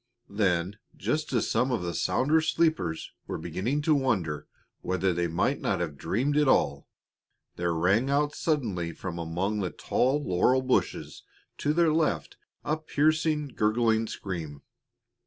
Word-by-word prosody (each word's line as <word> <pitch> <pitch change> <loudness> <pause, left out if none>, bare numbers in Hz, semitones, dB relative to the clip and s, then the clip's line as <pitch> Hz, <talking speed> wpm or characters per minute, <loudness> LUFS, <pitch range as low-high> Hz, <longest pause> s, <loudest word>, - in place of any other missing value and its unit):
Then, 95 -1 0 0.2
just 155 0 -1
as 120 -4 +1
some 130 +1 +1
of 115 -7 -1
the 85 -1 -3
sounder 145 +12 +2
sleepers 155 - 0 0.2
were - - -3
beginning 105 - -2
to 155 - +4
wonder 95 - 0 0.3
whether 95 0 0
they 85 0 0
might 85 0 0
not - - 0
have 80 -4 -3
dreamed 130 - -1
it 150 -1 +4
all, 70 - +2 0.7
there 85 -1 -1
rang 100 +10 +2
out 145 +1 +1
suddenly 105 - -1
from 85 0 -6
among 90 +6 -2
the 95 -3 -1
tall 135 +10 0
laurel 125 +6 +2
bushes 130 0 -1 0.4
to 145 - +1
their 165 0 +3
left 160 -1 0 0.3
a 150 +2 0
piercing, 155 -1 +1
gurgling 110 -1 +1
scream. 80 -10 -6
110 Hz, 145 wpm, -28 LUFS, 90-145 Hz, 0.7 s, to